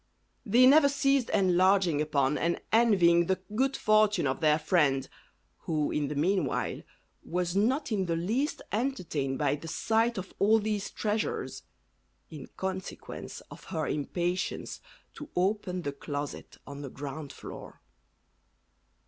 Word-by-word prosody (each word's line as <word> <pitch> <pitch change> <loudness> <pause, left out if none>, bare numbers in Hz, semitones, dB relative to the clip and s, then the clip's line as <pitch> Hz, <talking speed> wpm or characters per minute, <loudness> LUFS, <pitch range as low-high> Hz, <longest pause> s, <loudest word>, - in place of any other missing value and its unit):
They 240 +5 +6
never 280 +2 +7
ceased 275 -2 +1
enlarging 185 -3 +3
upon 145 -2 +1
and 170 +3 0
envying 180 -7 +4
the 190 0 +1
good 265 +4 +1
fortune 215 -4 +3
of 130 -1 -1
their 155 -2 +4
friend, 150 -4 +2 0.6
who 155 -2 0
in 150 -1 -1
the 150 - -4
meanwhile 170 -1 0 0.4
was 180 +1 -2
not 250 +7 +1
in 195 -4 0
the 165 - 0
least 225 - -1
entertained 180 - -2
by 145 -1 +1
the 165 - -10
sight 225 +6 +1
of 190 0 -6
all 215 +3 +5
these 210 -2 -2
treasures, 215 0 -2 0.7
in 150 -3 -9
consequence 190 0 -6
of - - -12
her 160 -5 -3
impatience 175 +5 -2 0.3
to 295 - -10
open 185 -1 0
the 145 - -2
closet 145 0 -6
on 140 0 -8
the 140 - -6
ground 140 +2 -7
floor. - - -10
180 Hz, 135 wpm, -29 LUFS, 150-215 Hz, 0.7 s, never